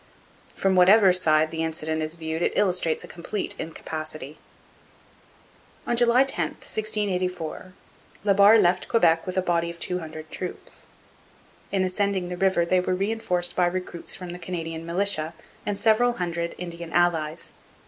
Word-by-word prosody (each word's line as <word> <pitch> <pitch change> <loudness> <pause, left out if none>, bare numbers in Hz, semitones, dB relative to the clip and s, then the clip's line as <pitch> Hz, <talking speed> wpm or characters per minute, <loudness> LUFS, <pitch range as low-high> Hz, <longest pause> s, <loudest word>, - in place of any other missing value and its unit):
From 195 -1 +1
whatever 190 +1 +6
side 155 -3 +3
the 160 0 -3
incident 160 0 -2
is 155 +1 -4
viewed 160 0 -4
it - - 0
illustrates 180 -5 +1
a - - -9
complete 185 +4 -4
incapacity. 155 -2 -6 1.5
On 240 - 0
July 240 +2 +5
10, 270 - -2
1684, 185 -5 -3 0.5
La 205 -1 +4
Barre 200 +3 +7
left 180 -1 +2
Quebec 165 -7 +3
with 185 - -4
a 185 - +2
body 170 -2 0
of 170 - -8
two 180 +1 -2
hundred 155 -1 -9
troops. 180 -1 -7 0.8
In 195 -1 +1
ascending 190 -1 -1
the 180 - -4
river 190 -2 +2
they 185 +2 +3
were 180 0 0
reinforced 195 -3 0
by 180 -1 +3
recruits 180 -1 -4
from 180 -2 -7
the 175 - -8
Canadian 165 -2 -5
militia 170 -3 -1 0.3
and 205 -1 -1
several 225 +3 +3
hundred 170 -4 -3
Indian 170 -1 -7
allies. 165 -2 0
180 Hz, 150 wpm, -25 LUFS, 165-195 Hz, 1.5 s, Barre